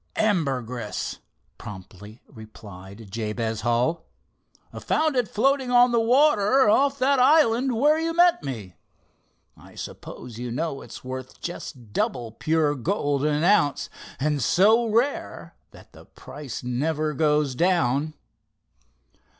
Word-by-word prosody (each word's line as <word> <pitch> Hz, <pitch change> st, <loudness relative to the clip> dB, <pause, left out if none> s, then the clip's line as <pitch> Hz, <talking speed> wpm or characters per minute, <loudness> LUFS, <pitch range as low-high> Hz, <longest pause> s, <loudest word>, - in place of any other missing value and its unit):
"Ambergris," 135 Hz, -, -2 dB, 0.4 s
promptly 105 Hz, +2 st, -11 dB
replied 105 Hz, -3 st, -13 dB
Jabez 110 Hz, +1 st, -3 dB
Hull. 125 Hz, +9 st, 0 dB, 0.7 s
"Found 310 Hz, -2 st, 0 dB
it 245 Hz, -3 st, +1 dB
floating 265 Hz, +3 st, +1 dB
on 245 Hz, 0 st, +5 dB
the 235 Hz, -, +2 dB
water 255 Hz, -1 st, +3 dB
off 275 Hz, +6 st, +3 dB
that 275 Hz, +1 st, +2 dB
island 260 Hz, -2 st, +4 dB
where 300 Hz, +5 st, +3 dB
you 330 Hz, +1 st, -1 dB
met 350 Hz, -, +4 dB
me. 110 Hz, -10 st, -6 dB, 0.8 s
I -, -, -17 dB
suppose 120 Hz, -2 st, -9 dB
you 125 Hz, 0 st, -5 dB
know 140 Hz, +3 st, -3 dB
it's -, -, -11 dB
worth 130 Hz, 0 st, -8 dB
just 125 Hz, -10 st, -8 dB
double 120 Hz, -1 st, -2 dB
pure 155 Hz, +4 st, 0 dB
gold 145 Hz, -, -1 dB
an 150 Hz, +1 st, 0 dB
ounce, 175 Hz, -6 st, +2 dB, 0.3 s
and 145 Hz, 0 st, 0 dB
so 220 Hz, -, +4 dB
rare 235 Hz, +6 st, -2 dB
that -, -, -18 dB
the -, -, -15 dB
price 140 Hz, -6 st, -9 dB
never 150 Hz, +5 st, -1 dB
goes 150 Hz, -2 st, +1 dB
down." 155 Hz, -2 st, +1 dB
150 Hz, 120 wpm, -24 LUFS, -, 0.8 s, on